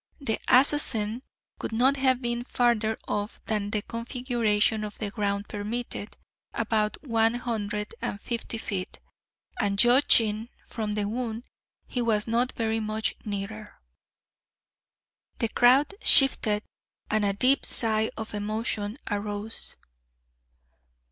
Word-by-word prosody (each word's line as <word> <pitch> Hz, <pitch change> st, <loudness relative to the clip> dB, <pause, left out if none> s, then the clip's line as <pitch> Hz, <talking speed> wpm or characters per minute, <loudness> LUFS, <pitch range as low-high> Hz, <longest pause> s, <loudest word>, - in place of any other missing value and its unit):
The 230 Hz, -6 st, -1 dB
assassin 250 Hz, -4 st, +3 dB, 0.4 s
could -, -, -4 dB
not 255 Hz, +5 st, +3 dB
have 260 Hz, -1 st, +2 dB
been 240 Hz, 0 st, -1 dB
farther 235 Hz, -3 st, +1 dB
off 205 Hz, +2 st, -3 dB
than 210 Hz, -2 st, -1 dB
the 210 Hz, -1 st, -2 dB
configuration 230 Hz, -3 st, 0 dB
of 210 Hz, 0 st, -6 dB
the 210 Hz, -2 st, -4 dB
ground 200 Hz, -1 st, -2 dB
permitted 215 Hz, +1 st, -5 dB, 0.4 s
about 215 Hz, -1 st, 0 dB
one 230 Hz, -3 st, +2 dB
hundred 210 Hz, -4 st, -3 dB
and 200 Hz, -, -3 dB
fifty 230 Hz, 0 st, -4 dB
feet 195 Hz, -4 st, -4 dB, 0.6 s
and 200 Hz, -1 st, 0 dB
judging 230 Hz, -2 st, +4 dB, 0.2 s
from 215 Hz, -3 st, -4 dB
the 205 Hz, -1 st, -1 dB
wound, 230 Hz, 0 st, -3 dB, 0.4 s
he 245 Hz, -, -3 dB
was 220 Hz, -3 st, +1 dB
not 235 Hz, +2 st, +1 dB
very 225 Hz, -1 st, -1 dB
much 215 Hz, 0 st, -1 dB
nearer." 210 Hz, +1 st, -6 dB, 1.6 s
The 230 Hz, -, 0 dB
crowd 255 Hz, -, +4 dB
shifted 215 Hz, -6 st, +5 dB, 0.5 s
and 215 Hz, 0 st, +2 dB
a 200 Hz, -1 st, +2 dB
deep 255 Hz, +7 st, +3 dB
sigh 220 Hz, -1 st, +2 dB
of 220 Hz, -1 st, -6 dB
emotion 210 Hz, +1 st, -2 dB
arose. 205 Hz, +1 st, -3 dB
220 Hz, 120 wpm, -27 LUFS, 210-240 Hz, 1.6 s, shifted